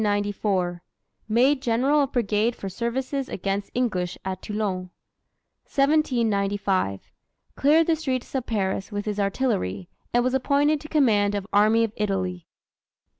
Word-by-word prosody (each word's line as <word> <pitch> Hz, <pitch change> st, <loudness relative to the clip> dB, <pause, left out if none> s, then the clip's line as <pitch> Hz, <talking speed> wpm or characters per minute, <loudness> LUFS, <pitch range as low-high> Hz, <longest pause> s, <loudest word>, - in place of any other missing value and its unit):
Made 260 Hz, +5 st, +3 dB
general 265 Hz, +4 st, +2 dB
of 275 Hz, -, -1 dB
brigade 225 Hz, 0 st, +1 dB
for 195 Hz, -, -6 dB
services 255 Hz, +6 st, -3 dB
against 195 Hz, +1 st, -3 dB
English 185 Hz, -8 st, -1 dB
at 185 Hz, -1 st, -4 dB
Toulon. 200 Hz, -4 st, -3 dB, 0.8 s
1795. 205 Hz, -, +1 dB, 0.4 s
Cleared 310 Hz, +4 st, +4 dB
the 330 Hz, -, +2 dB
streets 265 Hz, -6 st, -3 dB
of 260 Hz, -3 st, -2 dB
Paris 195 Hz, -2 st, -1 dB
with 205 Hz, 0 st, -3 dB
his 210 Hz, -1 st, -3 dB
artillery, 145 Hz, -, -1 dB, 0.2 s
and 240 Hz, 0 st, +3 dB
was 255 Hz, +1 st, 0 dB
appointed 285 Hz, +3 st, +2 dB
to 305 Hz, -, -9 dB
command 210 Hz, -10 st, +3 dB
of 200 Hz, -1 st, -3 dB
Army 215 Hz, +3 st, +4 dB
of 225 Hz, -2 st, -2 dB
Italy. 185 Hz, -4 st, -2 dB
220 Hz, 125 wpm, -25 LUFS, 195-265 Hz, 0.8 s, Cleared